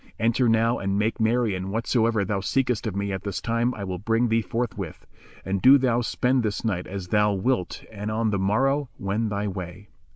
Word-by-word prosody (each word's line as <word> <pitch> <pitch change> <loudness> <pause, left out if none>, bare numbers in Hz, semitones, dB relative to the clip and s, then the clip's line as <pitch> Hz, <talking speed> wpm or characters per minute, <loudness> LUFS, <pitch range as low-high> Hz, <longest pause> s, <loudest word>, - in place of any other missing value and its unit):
Enter 115 +2 +2
now 115 +1 +2
and 100 0 -1
make 110 +3 0
merry 115 -1 +2
and 95 +1 -4
whatsoever 115 -1 +1
thou 100 +1 -1
seekest 125 +2 0
of 100 - -3
me 100 0 -2
at 95 - -3
this 100 -2 -4
time 115 +1 0
I 100 - -6
will 95 -2 -4
bring 115 +4 +1
thee 115 +1 +2
forthwith; 115 +2 -4 0.4
and 95 0 -1
do 135 +2 +8
thou 125 -3 +1
spend 125 +2 +1
this 110 0 -2
night 95 -5 -1
as 95 -2 -6
thou 105 0 +3
wilt 100 -1 -1
and 105 0 -5
on 110 0 0
the 100 - 0
morrow 135 +8 +1
wend 105 +3 -1
thy 100 +1 -1
way. 95 +1 -7
110 Hz, 205 wpm, -25 LUFS, 100-115 Hz, 0.4 s, do